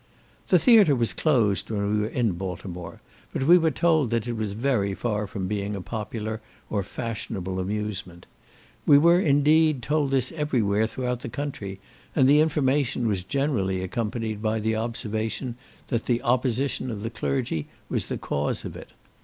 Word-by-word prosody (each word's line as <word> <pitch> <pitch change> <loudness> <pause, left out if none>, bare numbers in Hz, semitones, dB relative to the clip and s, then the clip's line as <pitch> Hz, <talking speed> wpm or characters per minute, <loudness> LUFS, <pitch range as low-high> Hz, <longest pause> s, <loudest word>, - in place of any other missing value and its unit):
The 185 - +5
theatre 200 - +6
was 115 -6 +1
closed 115 - +1
when 100 -1 -1
we 105 - +2
were 105 - 0
in 115 -2 0
Baltimore, 90 -1 -6 0.3
but - - -2
we 175 +6 +7
were 165 -1 +3
told 160 -5 +2
that 115 0 -1
it 120 - -1
was 110 -3 -3
very 110 -4 0
far 105 -2 -2
from 95 -2 -4
being 105 0 -2
a - - -4
popular 110 +1 -4 0.3
or 105 - +1
fashionable 100 -3 -4
amusement. 100 -3 -4 0.6
We 145 - +8
were, 170 +4 +6
indeed, 150 -3 +3
told 150 +1 +1
this 135 -2 +1
every 150 -7 0
where 105 +2 +2
throughout 125 0 -3
the - - -6
country, 110 -10 -5 0.4
and 130 -4 +5
the 145 +2 +6
information 140 -5 +1
was 100 -4 0
generally 95 -7 0
accompanied 110 +2 -3
by 110 0 0
the 110 +1 0
observation, 110 +2 -3 0.3
that 115 -2 -1
the 120 -1 +1
opposition 130 +2 0
of 105 -3 -5
the 115 - -3
clergy 115 - -2 0.2
was - - 0
the - - -3
cause 75 0 -2
of - - -6
it. - - -11
115 Hz, 170 wpm, -25 LUFS, 100-135 Hz, 0.6 s, We